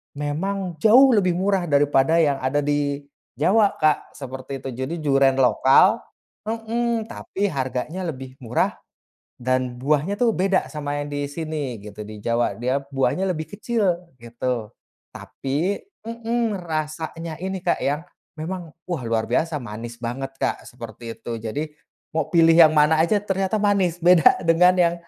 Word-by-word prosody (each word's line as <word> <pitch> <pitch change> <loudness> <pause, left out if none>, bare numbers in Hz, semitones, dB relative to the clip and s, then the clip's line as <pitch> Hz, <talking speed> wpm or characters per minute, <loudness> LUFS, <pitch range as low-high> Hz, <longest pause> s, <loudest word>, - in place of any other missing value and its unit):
memang 170 +4 -3
jauh 255 - +7
lebih 185 -6 +3
murah 190 -1 +1
daripada 145 0 +3
yang 140 -3 +1
ada 135 +3 0
di 145 0 -1 0.3
Jawa, 205 +1 +3
Kak, 155 -1 0
seperti 130 0 -7
itu. - - -4
Jadi 130 +6 -2
duren 135 -2 +4
lokal 135 - +5 0.5
mhm, 230 +1 -1
tapi 200 - -3
harganya 135 +5 -3
lebih 130 -3 -7
murah 120 -1 0 0.6
dan 130 0 -1
buahnya 150 +8 +1
tuh 240 +1 +3
beda 190 -1 +1
sama 145 -2 -3
yang 145 - -7
di 145 0 -2
sini 150 -4 -4
gitu, 105 0 -10
di 110 - -8
Jawa, 115 0 +1
dia 125 +4 0 0.2
buahnya 135 +8 +1
lebih 160 -4 -2
kecil 210 -7 0 0.2
gitu. 120 -1 -3 0.4
Tapi 155 +9 -2 0.3
mmm, 230 -1 -1
rasanya 160 0 -4
ini, 190 0 -2
Kak 175 -1 +1
ya, 145 +2 0 0.4
memang, 175 +1 -5 0.2
wah 170 -7 -2
luar 115 -1 0
biasa 155 +6 0
manis 115 0 -8
banget, 130 +3 -4
Kak, - - -1
seperti 115 -1 -9
itu. 115 0 -5
Jadi 145 +8 -3 0.5
mau 160 - -1
pilih 165 -1 +6
yang 165 -2 +8
mana 150 +1 +4
aja 210 +5 +2
ternyata 195 +1 -1
manis, 195 -4 +2
beda 175 -1 +5
dengan 180 +2 +6
yang 170 -1 +3
155 Hz, 150 wpm, -23 LUFS, 135-185 Hz, 0.6 s, yang